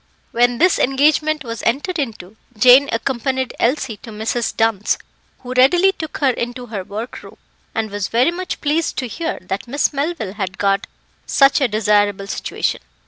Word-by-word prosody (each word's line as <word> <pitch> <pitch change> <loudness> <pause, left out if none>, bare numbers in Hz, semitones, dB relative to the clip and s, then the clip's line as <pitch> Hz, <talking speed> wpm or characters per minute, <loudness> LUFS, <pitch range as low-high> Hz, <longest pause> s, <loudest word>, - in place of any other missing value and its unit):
When 245 +1 +2
this 360 +5 +3
engagement 300 +3 +2
was 230 -2 -6
entered 295 +9 -1
into 215 -7 -5 0.2
Jane 255 +5 +7
accompanied 260 +2 -1
Elsie 245 -3 0
to 230 - -12
Mrs. 220 +2 -2
Dunn's, 225 -2 +1 0.4
who 250 0 -6
readily 345 +10 +5
took 315 -4 -7
her 275 -3 +3
into 245 +1 -4
her 215 -5 -5
work 215 +6 -7
room, - - -14 0.4
and 220 -2 -2
was 205 -2 -2
very 250 +8 +2
much 365 +1 -5
pleased 310 +2 0
to 255 - -2
hear 325 +7 -4
that 190 +5 -4
Miss 285 +4 0
Melville 280 - -2
had 190 -3 -4
got 195 -1 +1 0.4
such 275 +1 +4
a 270 - +4
desirable 205 -2 +1
situation. 200 - -2
245 Hz, 165 wpm, -19 LUFS, 215-285 Hz, 0.4 s, Jane